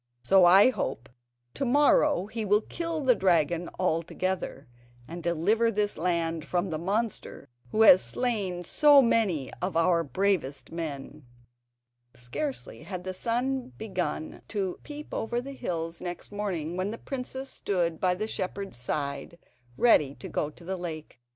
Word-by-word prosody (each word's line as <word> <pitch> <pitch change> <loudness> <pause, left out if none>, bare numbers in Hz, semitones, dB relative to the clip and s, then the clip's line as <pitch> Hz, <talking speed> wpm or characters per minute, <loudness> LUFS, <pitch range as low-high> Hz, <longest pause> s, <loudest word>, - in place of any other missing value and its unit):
So 190 +6 +6
I 195 +8 +7
hope 135 - -4 0.4
to - - -3
morrow 285 -2 +4
he 220 +2 -4
will 210 +1 +3
kill 330 +4 -4
the 260 -3 +5
dragon 175 -4 +1
altogether, 170 -3 -2 0.4
and 170 +2 -7
deliver 185 +8 +2
this 205 -1 0
land 165 -1 -1
from 175 +2 -1
the 155 - -2
monster 205 +5 -3 0.2
who 220 - +3
has 185 -4 +9
slain 200 -8 -2
so 290 - +6
many 195 - +1
of 180 -2 -1
our 170 0 +3
bravest 145 -5 -1
men." 150 -3 -6 0.9
Scarcely 140 - -5
had 180 +2 -6
the 185 0 -4
sun 250 +5 -1
begun 180 -7 -3
to 195 -4 -3
peep 295 0 -9
over 235 +2 -1
the 275 +3 -7
hills 165 -8 -4
next 175 +2 -6
morning, 180 -6 -3
when 185 +2 -1
the 225 - -5
princess 265 +1 -5
stood 170 -4 -1
by 180 -1 +2
the 210 +4 -2
shepherd's 195 - -4
side, 140 +5 -3 0.4
ready 150 - +4
to - - -9
go 150 - -2
to 155 - -16
the 190 +1 -3
lake. 160 -7 -7
185 Hz, 150 wpm, -28 LUFS, 165-225 Hz, 0.9 s, has